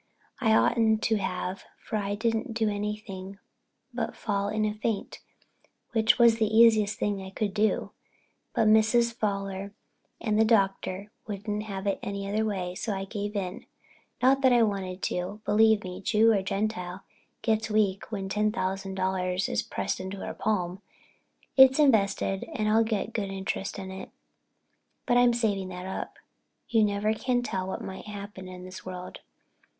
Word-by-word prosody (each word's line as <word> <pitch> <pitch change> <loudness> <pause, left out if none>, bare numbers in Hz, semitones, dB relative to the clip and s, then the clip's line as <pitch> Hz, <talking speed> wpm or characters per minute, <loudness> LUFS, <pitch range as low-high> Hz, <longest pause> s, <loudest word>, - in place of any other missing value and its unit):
I 220 -4 +4
oughtn't 220 -2 +3
to 220 - +2
have 185 -1 -3
for 220 - -6
I 200 -1 -2
didn't 225 +2 -1
do 220 -1 +1
anything 205 -2 -4 0.6
but 235 -2 -3
fall 200 -2 -1
in 215 0 0
a 210 - 0
faint, 215 -1 -3 0.7
which 220 -1 +3
was 235 -2 +6
the 220 -2 +2
easiest 220 -3 +5
thing 205 -2 -1
I 190 - -7
could 200 +1 -2
do. 215 +1 +1 0.6
But 225 -3 +3
Mrs. 225 +2 +4
Fowler 200 -2 -3 0.4
and 215 -2 0
the - - +7
Doctor 200 -2 +1 0.2
wouldn't 210 0 -3
have 195 -2 -5
it 200 - 0
any 200 0 -4
other 215 +2 0
way, 190 -4 -2
so 205 +2 -3
I 195 0 -3
gave 205 +1 -4
in. 185 -2 -4 0.6
Not 270 +1 +5
that 260 -1 +5
I - - +5
didn't 230 -3 +5
want 190 -2 -5
to. 180 +4 -2
Believe 220 0 +4
me, 185 +1 -7
Jew 225 +2 +4
or 200 - +2
Gentile 195 -2 -3 0.4
gets 220 -1 +1
weak 210 -1 +1
when 195 -3 -3
ten 210 +2 +1
thousand 195 -2 -3
dollars 185 -1 0
is - - 0
pressed - - -3
into 190 +1 -5
her - - -4
palm. 185 -3 -1 0.8
It's 265 0 +8
invested 200 -8 +2
and 215 - 0
I 220 +1 +4
get 220 -1 -1
good 205 -3 -2
interest 195 0 -3
on 190 -1 -6
it, 190 0 -8 1.0
but 245 - +2
I'm 245 0 +6
saving 205 -5 0
that 180 0 -7
up. 190 - -5 0.5
You 225 -2 +4
never 210 +1 +1
can 245 +2 0
tell 190 -5 -3
what 190 - -4
may 190 - -6
happen 200 -2 -8
in 180 0 -9
this 185 0 -9
world. 185 -1 -7
205 Hz, 170 wpm, -28 LUFS, 190-220 Hz, 1.0 s, It's